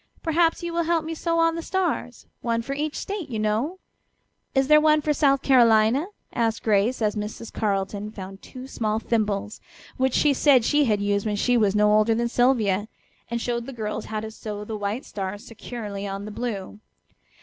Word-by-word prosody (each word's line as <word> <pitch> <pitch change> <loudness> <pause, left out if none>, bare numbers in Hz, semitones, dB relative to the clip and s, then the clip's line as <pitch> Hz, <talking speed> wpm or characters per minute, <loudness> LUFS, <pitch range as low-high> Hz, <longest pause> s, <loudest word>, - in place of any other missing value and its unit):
"Perhaps 330 +1 +2
you 340 0 -3
will 340 0 0
help 330 -1 +1
me 325 - -3
sew 335 +1 -1
on 330 0 +3
the 335 - -4
stars, 345 -9 -2 0.2
one 230 -1 -1
for 275 - -4
each 300 +2 -3
State, 395 -6 -4
you 230 - -3
know." 215 - -1 0.8
"Is 270 0 +3
there 305 +1 +7
one 305 0 +4
for 300 0 0
South 275 -2 +2
Carolina?" 240 +3 +4 0.3
asked 225 -1 0
Grace, 220 +3 +2
as 210 0 +1
Mrs. 215 +2 -6
Carleton 200 0 -2
found 195 -2 -9
two 255 -1 -10
small 220 -5 -2
thimbles, 215 -2 -1 0.4
which 260 -1 +1
she 295 -2 +4
said 265 -4 +4
she 295 +2 +3
had 210 -4 +1
used 205 +1 0
when 210 - 0
she 245 +4 +2
was 210 -4 +3
no 210 0 +4
older 215 +1 +4
than 235 +1 0
Sylvia, 220 -5 +2 0.4
and 235 0 -2
showed 235 0 -2
the 270 - -6
girls 215 -2 -4
how 215 -1 -4
to 220 0 -6
sew 210 -1 -6
the 220 - -5
white 210 +4 -3
stars 195 +1 -5
securely 210 -3 -6
on 195 +1 -5
the 215 - -7
blue. 210 -3 -5
230 Hz, 195 wpm, -24 LUFS, 210-275 Hz, 0.8 s, there